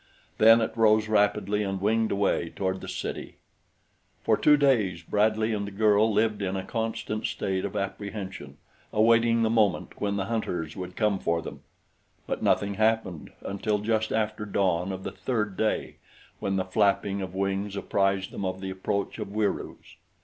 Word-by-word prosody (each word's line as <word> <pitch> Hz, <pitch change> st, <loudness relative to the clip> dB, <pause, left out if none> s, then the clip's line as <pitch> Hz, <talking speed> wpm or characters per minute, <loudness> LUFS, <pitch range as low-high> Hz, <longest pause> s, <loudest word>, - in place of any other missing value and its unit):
Then 115 Hz, +1 st, +7 dB
it 110 Hz, 0 st, -2 dB
rose 110 Hz, -1 st, +4 dB
rapidly 105 Hz, -1 st, +2 dB
and 95 Hz, -2 st, -2 dB
winged 110 Hz, +3 st, +1 dB
away 100 Hz, -4 st, +1 dB
toward 95 Hz, +1 st, -3 dB
the -, -, -8 dB
city. -, -, -5 dB, 0.9 s
For -, -, +3 dB
two 150 Hz, 0 st, +5 dB
days 110 Hz, -, +2 dB
Bradley 110 Hz, +4 st, +1 dB
and 100 Hz, -1 st, -2 dB
the -, -, -6 dB
girl 105 Hz, +2 st, +3 dB
lived 105 Hz, 0 st, +1 dB
in 95 Hz, -1 st, -1 dB
a 95 Hz, -, -3 dB
constant 110 Hz, -1 st, -3 dB
state 95 Hz, -1 st, -2 dB
of -, -, -5 dB
apprehension, 100 Hz, -7 st, -5 dB, 0.3 s
awaiting 115 Hz, +1 st, +4 dB
the 110 Hz, -, +2 dB
moment 105 Hz, -5 st, +1 dB
when 100 Hz, -1 st, 0 dB
the 100 Hz, -1 st, -1 dB
hunters 90 Hz, -8 st, -3 dB
would 90 Hz, -1 st, -7 dB
come 105 Hz, -3 st, +1 dB
for 85 Hz, -2 st, 0 dB
them; -, -, -8 dB, 0.6 s
but -, -, -3 dB
nothing 100 Hz, 0 st, +2 dB
happened 110 Hz, -5 st, 0 dB
until 105 Hz, +2 st, -1 dB
just 110 Hz, +1 st, 0 dB
after 110 Hz, -1 st, -1 dB
dawn 95 Hz, -3 st, 0 dB
of 95 Hz, 0 st, -6 dB
the -, -, -4 dB
third 105 Hz, -6 st, -2 dB
day, 110 Hz, +2 st, -1 dB, 0.4 s
when 95 Hz, -, -1 dB
the 95 Hz, -1 st, 0 dB
flapping 100 Hz, 0 st, +1 dB
of 95 Hz, -1 st, -6 dB
wings 100 Hz, +1 st, -1 dB
apprised 95 Hz, -1 st, 0 dB
them -, -, -5 dB
of 95 Hz, 0 st, -2 dB
the 95 Hz, 0 st, -5 dB
approach 95 Hz, +1 st, -3 dB
of -, -, -4 dB
Wieroos. 105 Hz, 0 st, -3 dB
100 Hz, 170 wpm, -27 LUFS, 95-110 Hz, 0.9 s, Then